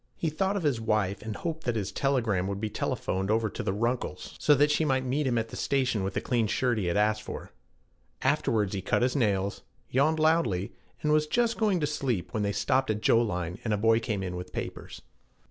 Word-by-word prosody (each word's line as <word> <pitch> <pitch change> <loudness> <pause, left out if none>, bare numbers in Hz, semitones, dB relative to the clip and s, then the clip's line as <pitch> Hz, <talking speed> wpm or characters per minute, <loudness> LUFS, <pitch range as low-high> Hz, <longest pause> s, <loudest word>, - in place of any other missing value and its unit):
He 160 - -1
thought 190 +5 0
of 190 - -3
his 135 -7 +1
wife, 105 -3 0
and 110 -2 -5
hoped 160 +3 -4
that 120 -2 0
his 100 -3 -2
telegram 115 -7 +1
would 100 0 -3
be 110 0 -3
telephoned 95 0 -2
over 110 -1 +1
to - - -5
the - - -1
Runkles' 115 +5 -2
so 150 - +5
that 145 +2 +4
she 155 - +2
might 130 -3 +1
meet 135 +3 0
him 120 -2 +1
at 115 0 -1
the - - -8
station 130 -7 0
with 95 - -3
the - - 0
clean 120 -3 +1
shirt 120 +1 +1
he 95 - -1
had 85 - +1
asked 110 +1 +2
for. - - -8 0.7
Afterwards 105 -3 +1
he 95 - -2
cut 95 - +1
his 125 +2 +1
nails, 100 -6 0 0.3
yawned 150 +5 +3
loudly, 155 - +2 0.3
and 150 - +2
was 155 0 +3
just 235 +6 +1
going 210 -5 +2
to - - +2
sleep 135 -10 -2
when 110 - 0
they 100 0 +1
stopped 130 +5 +1
at 110 0 -1
Joline 90 -6 +1
and 110 -2 +1
a - - -2
boy 115 +2 +4
came 105 -4 -2
in 90 -1 -4
with 90 0 -7
papers. - - -6
115 Hz, 230 wpm, -28 LUFS, 100-140 Hz, 0.7 s, so